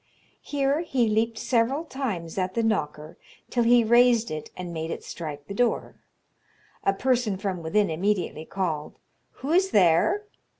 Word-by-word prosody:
Here 280 0 0
he 265 -8 +1
leaped 220 +1 +1
several 250 +6 +1
times 210 - -4
at 185 0 -2
the 230 - +1
knocker, 155 -7 -2 0.3
till 245 - +1
he 240 0 +5
raised 235 -1 +4
it 155 -1 -5
and 180 -2 -6
made 160 0 -4
it - - -5
strike 150 -4 -7
the 200 - -7
door. 240 +3 0 0.9
A - - +3
person 240 -1 0
from 190 -3 -3
within 195 +4 +1
immediately 175 -2 -1
called, 160 -6 -3 0.5
"Who 290 - -1
is 375 +3 +3
there?" 195 - +3
210 Hz, 155 wpm, -26 LUFS, 170-245 Hz, 0.9 s, he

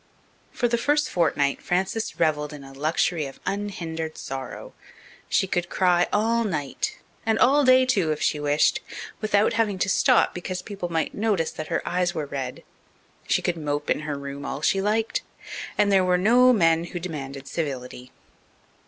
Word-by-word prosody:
For 240 - 0
the 235 0 0
first 295 +3 +1
fortnight 145 -5 +1
Frances 190 +5 -1
revelled 150 -2 +1
in 145 -2 -9
a 135 0 -12
luxury 155 +2 0
of 135 - -12
unhindered 165 -6 -4
sorrow. 135 -1 -7 0.6
She - - +2
could 175 -2 -2
cry 180 -2 +3
all 230 +3 +2
night 205 - -3 0.3
and 220 -1 +1
all 285 +3 +5
day 255 0 +6
too, 195 -11 +1
if 150 - -2
she 150 - +1
wished 145 +1 +2 0.4
without 215 -1 +2
having 220 -4 +1
to 190 - 0
stop - - +4
because 180 +1 -5
people 195 -4 -5
might 165 -1 -1
notice 200 -6 0
that 155 - -6
her - - -2
eyes 180 0 0
were 155 -2 -2
red. 135 -3 -5 0.6
She - - +1
could 175 -1 0
mope 145 -1 -2
in - - +2
her 150 -2 -4
room 140 0 -7
all 140 +1 -5
she 195 0 +2
liked. 215 +3 0 0.6
And 205 -1 +3
there 190 -1 +5
were 180 0 +3
no 245 +7 +5
men 165 -6 +3
who 175 +1 -6
demanded 140 -5 -6
civility. 130 -5 -5
175 Hz, 170 wpm, -25 LUFS, 150-210 Hz, 0.6 s, day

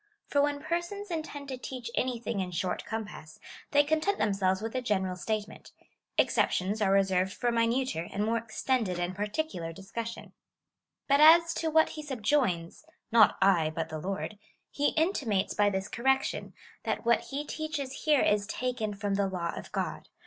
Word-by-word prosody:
For 285 - +2
when 285 0 0
persons 350 +4 -3
intend 310 -3 -5
to 260 -2 -5
teach 250 -2 -6
anything 235 -4 -1
in 185 -1 -2
short 180 +1 -2
com 220 -1 -3
pass, 155 -6 -12 0.3
they 290 0 +5
content 315 +7 +1
themselves 195 -2 +1
with 225 +2 -5
a 255 - -1
general 190 -6 0
statement. 215 +3 -4 0.4
Exceptions 200 +4 +2
are 195 -2 +3
reserved 190 -1 +3
for 240 - -1
a - - +1
minuter 230 -7 0
and 205 +2 -1
more 230 +1 +1
extended 225 -3 -1
and 175 +1 -2
particular 205 - -3
discussion. 225 +6 -7 0.7
But 280 0 +4
as 330 +2 +7
to 325 - -1
what 315 0 +4
he 310 - -7
subjoins 240 - 0
— - - -51
not 225 -2 +6
I, 175 -5 +4
but 160 0 -4
the 155 - -5
Lord 195 +4 -4 0.2
— - - -48
he 290 0 +1
in 325 +5 +3
timates 210 - -1
by 205 0 +4
this 190 0 -2
correction, 265 +5 0 0.3
that - - -2
wdiat 235 0 +2
he 285 +2 -3
teaches 295 -4 -4
here 300 -3 +5
is 205 -1 +2
taken 225 -3 -2
from 200 0 -2
the 200 0 +1
law 175 -3 -3
of - - -8
God. - - -3
225 Hz, 180 wpm, -29 LUFS, 195-280 Hz, 0.7 s, as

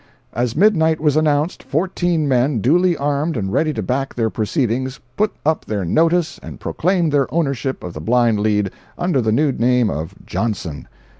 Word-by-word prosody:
] - - -39
As 120 0 -1
midnight 160 -4 +3
was 150 -2 +2
announced, 155 +1 +1
fourteen 175 -1 0
men, 130 -1 +2
duly 170 - +3
armed 145 +1 -1
and 95 -2 -3
ready 155 -1 +2
to 110 - -3
back 135 +6 -2
their 115 -2 0
proceedings, 125 +2 -1 0.2
put 210 0 +1
up 160 0 +1
their 100 -4 -2
"notice" 165 - +1
and - - -9
proclaimed 175 -2 0
their 140 -3 +1
ownership 140 -4 -1
of 90 - -6
the 75 - -7
blind 115 +2 +2
lead, 105 -2 +1 0.3
under 175 -7 +1
the 110 -1 0
new 145 +5 +2
name 125 -2 +2
of 80 +2 -5
the - - -20
"Johnson." 95 -10 -3
135 Hz, 180 wpm, -19 LUFS, 115-160 Hz, 0.3 s, midnight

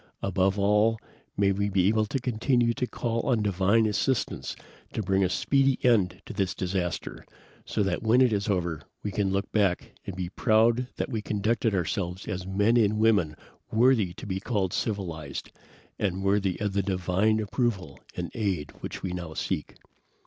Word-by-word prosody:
Above 95 0 +1
all, 105 +3 +3 0.4
may 100 -1 +3
we 100 +1 0
be 95 -1 +2
able 110 0 +2
to 135 - -1
continue 120 0 +1
to 125 - -2
call 115 -1 -2
on 115 -4 +2
divine 100 +3 +3
assistance 105 +4 -1 0.4
to 110 - -2
bring 95 0 +2
a 90 - +2
speedy 135 +7 +2
end 100 -7 +3
to - - -7
this 95 -3 -1
disaster, 90 -1 -3 0.4
so 105 - 0
that 95 -3 -1
when 115 +3 +4
it 125 -3 +4
is 100 +1 -1
over 85 -5 -1 0.2
we 105 - -2
can 100 -1 0
look 100 +1 -1
back 100 -4 +1 0.2
and 95 - -4
be 90 -2 -3
proud 115 +4 +3
that - - -3
we 110 -3 -1
conducted 110 +1 0
ourselves 90 0 -2
as 90 0 -4
men 105 +5 +3
and 105 -2 +3
women 105 -9 +3 0.4
worthy 115 -5 +4
to - - -10
be 95 -1 -2
called 100 -4 -1
civilized, 85 - -3 0.5
and 95 -1 -1
worthy 100 -2 +1
of 105 -3 -1
the 100 - +2
divine 95 +3 +1
approval 100 - -2 0.2
and 85 -1 -4
aid 95 -9 -2
which - - -6
we 95 - -2
now 85 -3 -5
seek." 75 - -3
100 Hz, 175 wpm, -27 LUFS, 95-110 Hz, 0.5 s, when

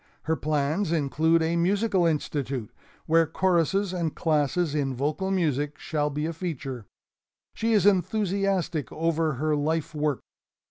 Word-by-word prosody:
Her 160 - 0
plans 155 +5 0
include 160 +1 +2
a 165 +1 0
Musical 190 +1 +2
Institute 140 -6 -2 0.3
where 165 0 +4
choruses 185 +3 +1
and 170 -4 -2
classes 155 0 +1
in 140 -3 -1
vocal 150 +9 -1
music 150 -6 0
shall 150 -2 -1
be 150 +1 -3
a 165 - -2
feature. 140 - -5 0.7
She 225 0 0
is 205 -4 +3
enthusiastic 195 -4 +1
over 165 -1 0
her 150 +4 0
life 155 +1 -1
work. 150 -3 -1
160 Hz, 135 wpm, -26 LUFS, 150-180 Hz, 0.7 s, where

